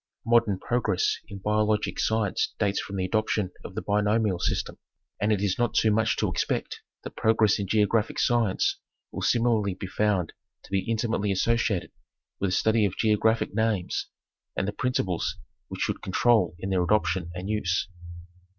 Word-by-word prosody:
Modern 115 -4 +3
progress 120 +5 0
in 100 - -8
biologic 105 +1 0
science 110 -3 0
dates 100 -2 0
from 100 - -7
the 95 -1 -1
adoption 105 -1 0
of - - -9
the - - -3
binomial 105 -2 +1
system, - - -2 0.4
and 105 +1 +2
it 105 -2 +1
is 100 +1 0
not 120 -2 0
too 110 - +4
much 110 +1 +1
to - - +1
expect - - -2 0.2
that - - -8
progress 110 -2 +3
in 100 - -2
geographic 105 +2 +1
science 115 -5 +1 0.3
will - - -5
similarly 115 -5 +2
be 95 - -6
found 95 -2 0 0.3
to - - -17
be 95 +3 -1
intimately 110 -3 0
associated 110 -1 0 0.5
with 100 - 0
a - - -2
study 110 +2 +3
of 100 - 0
geographic 110 0 +2
names 110 -4 -1 0.5
and 95 - -1
the - - 0
principles 105 -8 -1 0.3
which - - -7
should - - -1
control 95 -3 +2
in 95 +2 -4
their 95 -1 +2
adoption 90 -2 +1
and 90 +2 -5
use. 95 -5 0
105 Hz, 165 wpm, -26 LUFS, 95-110 Hz, 0.5 s, too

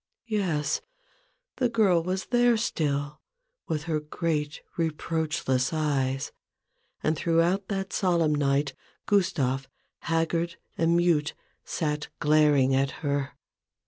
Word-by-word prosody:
Yes; 175 -10 0 0.8
the 250 -2 +2
girl 205 -7 +3
was 185 +3 -2
there 240 -1 +3
still, 150 - -1 0.5
with 150 -2 -2
her 160 -2 -1
great 150 -1 -2 0.2
reproachless 155 -5 0
eyes; 135 -4 0 0.7
and 155 - +2
throughout 170 +5 +1
that 195 -1 -3
solemn 170 -5 +2
night 140 -1 +1 0.3
Gustave, 135 -9 +1 0.3
haggard 165 +1 0 0.2
and 170 +1 +3
mute, 170 -4 +2 0.3
sat 150 -2 -2
glaring 150 -3 +4
at 135 +1 +2 0.2
her. 140 -1 -1
155 Hz, 105 wpm, -27 LUFS, 145-175 Hz, 0.8 s, glaring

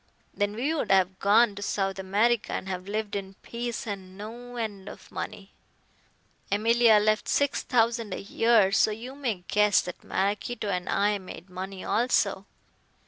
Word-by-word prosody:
Then 205 0 -1
we 270 +8 0
would 290 -9 -2
have 190 -1 +3
gone 210 +2 +4
to 200 - -8
South 195 -1 -1
America 210 +5 +1
and - - -3
have 185 0 -5
lived 210 0 -3
in 195 -1 -5
peace 240 +2 -4
on 190 -3 -7
no 240 +4 -8
end 205 -4 -4
of - - -13
money. 205 -2 -6 1.0
Emilia 225 +2 +5
left 215 +1 +1
six 285 -1 +1
thousand 230 -2 +1
a - - -3
year, 215 -1 +3
so 215 - +4
you 230 +5 -6
may 240 -10 -3
guess 210 0 +4
that 180 - -8
Maraquito 205 +3 -2
and 180 -2 -2
I 205 0 +2
made 185 -1 -11
money 190 +1 -6
also. 205 -5 +1
210 Hz, 160 wpm, -27 LUFS, 195-230 Hz, 1.0 s, Emilia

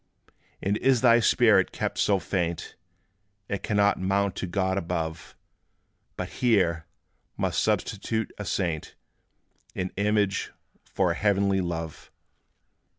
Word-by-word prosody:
And 100 +2 +1
is 130 -1 +3
thy 120 -2 +6
spirit 110 -5 +4
kept - - -3
so 100 - +3
faint, 85 -2 -3 0.7
It 100 - -3
cannot 100 -1 +2
mount 100 +1 +1
to 95 - -3
God 95 +1 0
above; 80 -3 -4 0.8
But - - -4
here 90 -9 +2 0.5
must - - 0
substitute 110 -1 -1
a 105 - -4
saint, 85 -6 -2 0.8
In 90 0 -3
image, 100 -1 0 0.3
for 90 -3 0
a - - -2
heavenly 100 0 +2
love? 80 -3 -5
95 Hz, 115 wpm, -26 LUFS, 85-105 Hz, 0.8 s, thy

